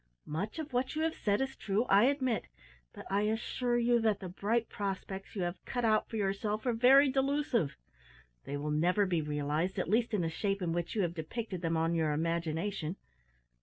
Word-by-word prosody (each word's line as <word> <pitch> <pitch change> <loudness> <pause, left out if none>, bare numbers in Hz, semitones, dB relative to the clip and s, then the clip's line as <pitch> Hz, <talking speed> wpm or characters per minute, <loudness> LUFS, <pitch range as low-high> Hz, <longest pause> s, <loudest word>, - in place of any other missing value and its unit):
Much 175 - -4
of 305 -4 -5
what 255 +4 0
you 315 - 0
have 325 0 +1
said 205 +1 0
is 270 0 -2
true, 205 +3 0
I 205 -2 +5
admit, 260 -4 +1 0.5
but - - -10
I 200 +1 +2
assure 240 +2 0
you 240 0 +3
that 215 -3 +2
the 185 - -6
bright 220 +5 0
prospects 195 0 -5
you 190 - -1
have 175 +1 -4
cut 245 -2 -2
out 215 -1 +2
for - - -6
yourself 205 +2 -1
are 245 - +2
very 260 +5 +6
delusive. 270 - +1 0.7
They 145 - -3
will 150 +1 -3
never 175 +7 +3
be 175 -4 +1
realised, 150 +5 -1
at 185 - -1
least 230 0 +2
in 200 - +1
the 165 - 0
shape 195 +4 -1
in 165 -2 0
which 175 +3 -2
you 205 - +2
have 170 -1 -1
depicted 185 +3 -5
them 165 -1 0
on 165 +1 +1
your 160 -2 +1
imagination. 165 +2 -1
200 Hz, 205 wpm, -32 LUFS, 170-235 Hz, 0.7 s, very